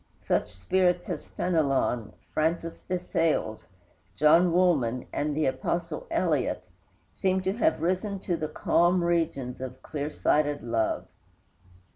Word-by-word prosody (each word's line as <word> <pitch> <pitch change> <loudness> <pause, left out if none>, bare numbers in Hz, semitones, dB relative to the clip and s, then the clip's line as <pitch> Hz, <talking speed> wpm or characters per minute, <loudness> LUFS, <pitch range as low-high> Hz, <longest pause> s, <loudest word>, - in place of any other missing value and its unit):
Such - - 0
spirits 180 - +1
as - - -5
Fénelon, 135 - 0 0.2
Francis 165 +1 -1
de 185 - -2
Sales, 165 -10 -1 0.5
John 165 +4 +5
Woolman, 150 -9 +2
and 150 0 -1
the 155 - +2
apostle 165 - -2
Eliot, - - 0 0.5
seem 190 -1 0
to 190 +1 0
have 280 - +1
risen 185 +3 0
to 180 - -1
the 155 -2 -3
calm 175 +3 +2
regions 155 -7 -1
of 130 0 -7
clear 145 -1 -3
sighted 145 -1 +1
love. 115 -2 0
165 Hz, 125 wpm, -27 LUFS, 135-180 Hz, 0.5 s, John